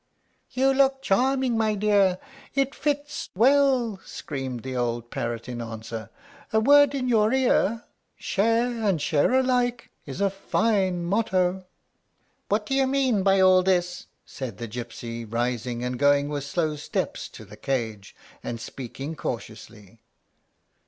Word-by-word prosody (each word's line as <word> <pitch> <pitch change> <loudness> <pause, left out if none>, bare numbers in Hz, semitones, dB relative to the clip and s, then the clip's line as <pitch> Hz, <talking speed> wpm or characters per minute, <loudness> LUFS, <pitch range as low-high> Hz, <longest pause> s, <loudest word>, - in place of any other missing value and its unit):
"You 265 +2 +2
look 270 0 +2
charming, 260 +3 +2
my 220 -1 +1
dear; 200 -3 +3 0.4
it 275 0 +1
fits 290 0 -3
well!" 255 -2 +3
screamed 130 -5 -6
the 130 0 -5
old 120 -1 -2
parrot 115 0 -4
in 120 -1 -5
answer. 115 -1 -7 0.4
"A 220 - +3
word 285 +4 +5
in 255 -2 -1
your 220 -3 +3
ear; 245 -4 +2 0.3
'Share 230 +3 0
and 195 -6 +2
share 145 +4 +2
alike' 250 -2 +1 0.2
is 135 +5 -6
a 200 -1 +2
fine 195 -3 0
motto." 185 -2 0 0.8
"What 210 +1 +1
do 270 - -3
you 270 0 +3
mean 260 -6 +2
by 195 0 +4
all 185 0 +6
this?" 180 -1 0 0.2
said 125 -8 -7
the 120 - -5
gypsy, 115 0 -6
rising, 120 0 -2
and 125 0 -3
going 145 0 +3
with 145 -2 -3
slow 155 +1 -1
steps 145 - -3
to - - -12
the - - -13
cage, 110 -7 -3 0.3
and 115 - -4
speaking 135 +6 -7
cautiously. 110 -4 -7
185 Hz, 140 wpm, -25 LUFS, -, 0.8 s, all